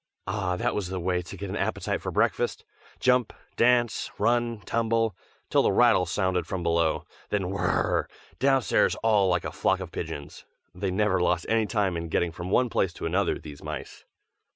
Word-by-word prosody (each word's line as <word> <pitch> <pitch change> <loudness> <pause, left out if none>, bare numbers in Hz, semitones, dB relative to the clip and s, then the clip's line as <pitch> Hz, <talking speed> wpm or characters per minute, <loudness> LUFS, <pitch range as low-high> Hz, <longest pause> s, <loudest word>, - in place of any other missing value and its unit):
Ah! 95 -4 -1
that - - 0
was 100 -4 -2
the 95 0 -4
way 90 0 0
to 90 +3 -9
get 100 0 -5
an - - -3
appetite - - -1
for - - -3
breakfast. - - 0 0.3
Jump, 125 -2 +3 0.2
dance, 120 -1 +2
run, 120 -2 +1
tumble, 115 -1 0 0.4
till - - +5
the - - +3
rattle 110 -7 +4
sounded 90 +1 0
from 95 -2 -3
below; 85 -1 +1 0.2
then 95 -3 -1
whirr! 95 -2 +1 0.3
downstairs 135 -2 +3
all 105 -4 +4
like 90 -1 +1
a - - -3
flock 95 - +1
of 90 -3 -7
pigeons. 80 -4 -6 0.3
They 95 +2 -2
never 95 0 +1
lost 90 -1 +1
any 110 -1 +2
time 100 -5 0
in 85 0 -4
getting 85 +1 +1
from 85 +2 -6
one 125 +6 +3
place 95 -6 0
to - - -6
another, 90 +3 +1
these 75 -2 -11
mice. 75 -2 -7
95 Hz, 180 wpm, -27 LUFS, 90-115 Hz, 0.4 s, till